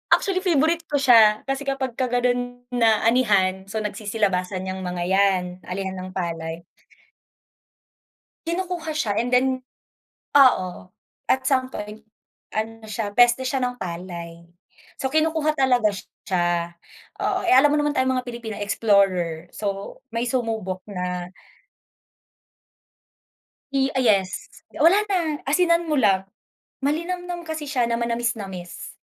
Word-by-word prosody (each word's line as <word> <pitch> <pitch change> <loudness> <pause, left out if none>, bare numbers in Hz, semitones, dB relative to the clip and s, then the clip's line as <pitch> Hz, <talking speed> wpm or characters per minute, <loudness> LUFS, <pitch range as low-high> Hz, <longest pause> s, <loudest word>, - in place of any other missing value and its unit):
Actually 380 -2 -1
favorite 330 +1 +2
ko - - +1
siya 225 -5 +6
kasi 270 +1 -2
kapag 270 -1 -1
ka 255 - +2
gano'n 245 0 +1 0.4
na 225 - +6 0.2
anihan, 205 -7 +3 0.2
so 220 -1 -2
nagsisilabasan 200 -3 -1
'yang 185 0 -4
mga 180 -1 -3
yan 195 -2 +3 0.3
anihan 190 0 -3
ng 185 0 -7
palay. 165 -2 -3 1.9
Kinukuha 345 -1 -3
siya 230 -9 0
and 245 +2 -1
then, 250 +1 +4 0.9
oo 250 -9 +5 0.6
at 265 - +1
some 260 -2 +2
point 210 +1 -7 0.5
ano 225 +1 -4
siya 210 -1 -3
peste 245 +1 +5
siya 265 -1 -1
ng 250 0 -2
palay. 170 -2 -7 0.6
So, 265 - 0
kinukuha 310 +1 +1
talaga 250 -6 +3 0.4
siya, 175 -2 0 0.4
oo, - - 0
eh, - - +6
alam 290 +3 +6
mo 300 - +2
naman 295 0 0
tayong 260 0 +2
mga 250 - -8
Pilipino 235 -3 -6
explorer, 195 -6 +1
so 200 -1 -4
may 230 +1 -1
sumubok 220 -7 -2
na. 180 -2 -4 2.4
Eh, 270 0 +1
ah, 260 - 0
yes 200 -6 +1 0.3
wala 335 +6 +6 0.2
na 320 -5 0
asinan 340 +2 +3
mo 305 - +1
lang, 195 -7 +3 0.6
malinamnam 345 +3 -2
kasi 315 -1 -4
siya 255 -4 +1
na 235 - 0
manamisnamis. 230 -7 -4
230 Hz, 130 wpm, -23 LUFS, 190-270 Hz, 2.4 s, siya